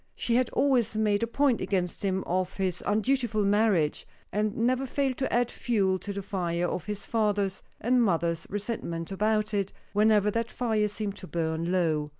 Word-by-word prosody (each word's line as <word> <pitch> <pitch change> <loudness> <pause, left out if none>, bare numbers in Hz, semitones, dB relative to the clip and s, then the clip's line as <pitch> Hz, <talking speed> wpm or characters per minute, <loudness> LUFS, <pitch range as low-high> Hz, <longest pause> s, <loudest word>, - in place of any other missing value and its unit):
She 235 - -1
had 255 +1 +3
always 250 -6 +2
made 210 -2 +2
a 230 - +1
point 265 +1 +2
against 185 -1 -2
him 190 -1 0
of 185 +1 -1
his 185 -2 -1
undutiful 220 -1 +1
marriage, 200 -7 +2 0.2
and 210 +1 -1
never 255 +3 +1
failed, 265 -1 0
to 265 - -1
add 240 0 +2
fuel 195 -6 +1
to 205 - -5
the 200 0 -4
fire 175 -3 -1
of 180 - -4
his 210 -1 -4
father's 205 -4 0 0.2
and 245 +2 +3
mother's 170 -4 0
resentment 200 -5 -4
about 215 +2 +1
it, 200 -2 0 0.2
whenever 210 0 +4
that 230 +2 -1
fire 220 -4 0
seemed 205 -1 -4
to 185 - -9
burn 165 0 -1
low. 160 -5 +1
205 Hz, 175 wpm, -28 LUFS, 185-230 Hz, 0.2 s, whenever